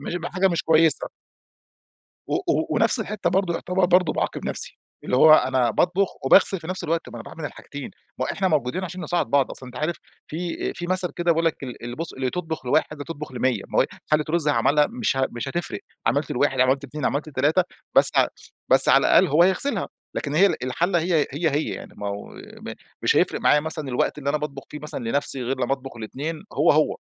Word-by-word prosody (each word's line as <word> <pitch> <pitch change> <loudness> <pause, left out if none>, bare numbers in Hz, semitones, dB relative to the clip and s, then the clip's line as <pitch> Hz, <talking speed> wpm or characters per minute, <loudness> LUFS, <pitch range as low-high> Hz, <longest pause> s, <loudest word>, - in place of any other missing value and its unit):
مش - - -3
ب 175 -1 -5
حاجة 190 +2 +1
مش 170 -3 -1
كويّسة. 160 0 +3 1.2
و - - -3
و 345 -3 0
ونفس 225 +3 +2
الحتّة 210 -4 -2
برضو 180 0 0
يعتبر 180 +2 0
برضو 180 -2 +3
باعاقب - - -3
نفسي، - - -1 0.2
اللي - - -1
هو 155 +2 +8
أنا 130 -5 +3
باطبخ 180 - +1 0.2
وباغسل 190 +6 +5
في 160 - -10
نفس 185 0 -4
الوقت 165 +1 -1
طب - - -12
ما - - -7
أنا - - -16
باعمل 160 -3 -8
الحاجتين، 145 -1 -8 0.3
ما 130 - -1
هو - - -4
إحنا 190 - 0
موجودين 155 +2 -1
عشان 185 0 -6
نساعد 175 +2 -1
بعض، 140 -1 +2
أصل 130 - -8
أنت 125 0 -12
عارف 155 +4 -1 0.3
في 170 +2 -4
آآ - - -6
في 175 - -6
مثل 185 -1 0
كده 175 -1 0
بيقول 165 0 0
لك 160 - -1
ال 125 -3 -8
ال 120 +1 -6
بُص 165 0 -5
اللي 130 -1 -2
تطبخ 160 -4 -5
ل1 150 +4 +1
تطبخ 150 0 -7
ل100 130 0 0
ما - - 0
هو - - +4 0.3
حلة 150 0 +3
رز 165 -2 +1
عملها 145 +3 +3
مش 225 - -1
ه 130 - +1
مش 120 -2 -5
هتفرق 175 -1 -4 0.3
عملت - - 0
ل1 - - 0
عملت 130 +2 +3
ل2 145 +2 -5
عملت 150 +3 -1
ل3 150 +6 +2 0.3
بس - - +8
ع - - +4 0.4
بس - - +8
على - - +5
الأقل 190 - +5
هو 155 +3 +4
هيغسلها، 190 +10 +1 0.3
لكن 145 0 -3
هي 190 +5 +6
ال 170 -9 0
الحلة 175 +8 0
هي 165 -1 +1
هي، 160 +4 0
هي 150 +2 -1
يعني - - -8
ماهو 100 0 -5 0.4
م - - -6 0.3
مش - - +2
هيفرق - - +2
معايا 150 - +4
مثلًا 155 -1 -5
الوقت 125 - -1
اللي 140 -1 -3
أنا 150 - +1
باطبخ 145 -2 -6
فيه 150 - -8
مثلًا 150 - -6
لنفسي 140 -1 -1
غير 130 +2 -2
لمّا 130 +2 +1
أطبخ 135 -2 -8
ل2 145 - -6
هو - - +4
هو، - - +2
155 Hz, 225 wpm, -23 LUFS, 135-175 Hz, 1.2 s, هو